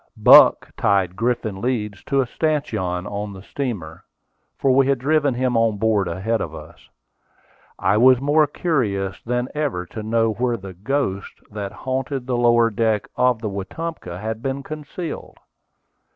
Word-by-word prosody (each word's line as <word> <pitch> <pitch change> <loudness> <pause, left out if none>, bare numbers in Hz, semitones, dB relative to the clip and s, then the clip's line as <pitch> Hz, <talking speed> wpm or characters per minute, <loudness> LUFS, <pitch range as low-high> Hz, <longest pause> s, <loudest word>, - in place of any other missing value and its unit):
Buck - - +7
tied 95 -3 +1
Griffin 115 -3 -2
Leeds 105 -6 -2
to 135 -1 +2
a - - 0
stanchion 120 - -2
on 105 0 -5
the 95 0 -11
steamer, 100 - -5 0.5
for 135 - +2
we 135 +1 +4
had 140 -1 +2
driven 145 0 +1
him 125 0 0
on 115 -2 +2
board 105 -3 +1
ahead 95 +7 -1
of - - -5
us. - - -13 0.9
I 105 - +2
was 125 +2 +6
more 145 +3 +3
curious 105 - -1
than 125 +1 -2
ever 145 -12 -2
to 110 - -8
know 115 +1 +1
where 120 +2 -1
the 95 -2 -9
"ghost" 100 0 -2 0.2
that 100 -2 -5
haunted 130 +3 -3
the 125 -1 -1
lower 120 -1 +4
deck 110 -1 0
of 125 -2 +2
the 105 - -1
Wetumpka 100 - -6
had 110 +2 -4
been 135 +1 -3
concealed. 155 +3 -7
115 Hz, 155 wpm, -21 LUFS, 100-135 Hz, 0.9 s, Buck